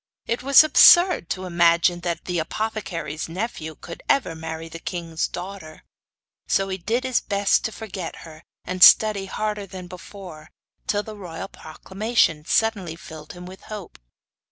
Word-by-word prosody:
It 235 - -2
was 275 +3 +7
absurd 345 - +6
to 185 0 -3
imagine 170 0 +3
that 170 -1 -4
the 180 -2 -2
apothecary's 170 -5 -4
nephew 165 -4 -5
could 170 - -10
ever 260 -11 +2
marry 160 0 -7
the 165 0 -9
king's 165 -2 -3
daughter; 180 -3 -9 0.6
so 195 0 +1
he 190 0 -4
did 230 +8 -1
his 260 -2 0
best 200 -1 +1
to 220 - -2
forget 195 -6 -7
her, 160 -1 -13 0.2
and 185 -1 +1
study 205 -1 +6
harder 210 0 -3
than 185 0 -9
before, 180 -2 -11 0.4
till 205 0 0
the 215 0 -9
royal 180 -2 -8
proclamation 190 -1 -1
suddenly 200 -5 0
filled 155 -2 -11
him 180 0 -10
with 185 +1 -11
hope. 210 -4 -9
185 Hz, 155 wpm, -23 LUFS, 165-210 Hz, 0.6 s, was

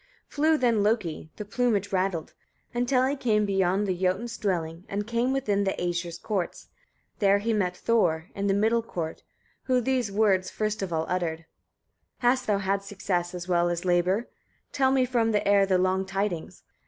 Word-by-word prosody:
10. - - -16
Flew 310 +2 +3
then 235 -6 +2
Loki 200 -8 -1
the 210 - -6
plumage 205 -2 0
rattled 185 -4 -1 0.4
until 245 +1 +2
he 275 +2 0
came 215 -6 +1
beyond 195 0 +1
the 185 -2 0
Jotun's 190 +6 -1
dwellings, 170 -4 -2
and 205 +1 -2
came 235 +3 0
within 210 -7 +1
the 195 - 0
Æsir's 175 -1 -2
courts; 190 -2 -4 0.5
there 200 -1 +4
he 225 +3 -1
met 180 -4 0
Thor, 175 -8 +1
in 200 0 -2
the 195 - +2
middle 225 +3 +2
court, 170 -8 -5 0.4
who 255 -1 +3
these 250 -3 0
words 195 -3 +2
first 215 0 -2
of 190 -2 -3
all 160 -1 0
uttered. 170 -3 -2
11. - - -26 0.7
"Hast 255 +1 +1
thou 205 -2 +2
had 195 0 0
success 185 -3 -2
as 175 0 -6
well 175 -1 +2
as 175 +1 -3
labour? 180 +5 +2 0.4
Tell 265 -2 +2
me 265 -1 +3
from 235 -3 +1
the 210 - +1
air 200 -1 +5
the 190 -1 +3
long 185 +1 +1
tidings. 195 -3 -3
200 Hz, 185 wpm, -27 LUFS, 180-230 Hz, 0.7 s, air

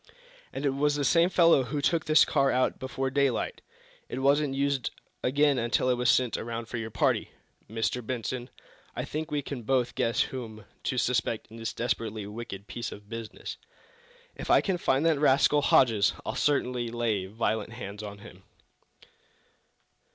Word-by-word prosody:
"And 145 - -4
it 140 - +3
was 145 +2 +1
the 145 -1 0
same 170 +3 +4
fellow 170 -6 +5
who 145 +4 -3
took 160 +3 +1
this 155 0 +6
car 140 -3 +2
out 130 0 +1
before 130 0 -3
daylight. 140 -3 0 0.5
It - - -4
wasn't 140 +1 +2
used 140 -2 0 0.3
again 140 +1 +3
until 120 +2 +1
it - - +4
was 125 -1 +1
sent 125 -2 +3
around 115 0 -4
for 120 - -5
your 115 -1 -4
party. - - +1 0.4
Mr. 115 +3 -1
Benson, 125 +1 -4 0.5
I - - -3
think 155 +2 -4
we 145 -1 -1
can 135 -3 -5
both 125 +1 +1
guess 115 - +1
whom 110 -5 -5 0.2
to 130 - -1
suspect 115 -2 0
in 115 - -10
this 115 0 -3
desperately 110 -3 -2
wicked 105 -2 -7
piece 120 +2 -5
of 105 0 -11
business. 115 -1 -7 0.8
If - - -7
I - - +7
can 190 -3 -1
find 135 +1 +1
that 160 -3 +3
rascal, 145 +1 +4
Hodges, 115 -7 +4
I'll - - -2
certainly 125 -4 0
lay 115 -5 -1
violent 110 +1 -2
hands 105 -4 -7
on 100 -1 -7
him!" 100 -3 -13
125 Hz, 170 wpm, -28 LUFS, 115-140 Hz, 0.8 s, I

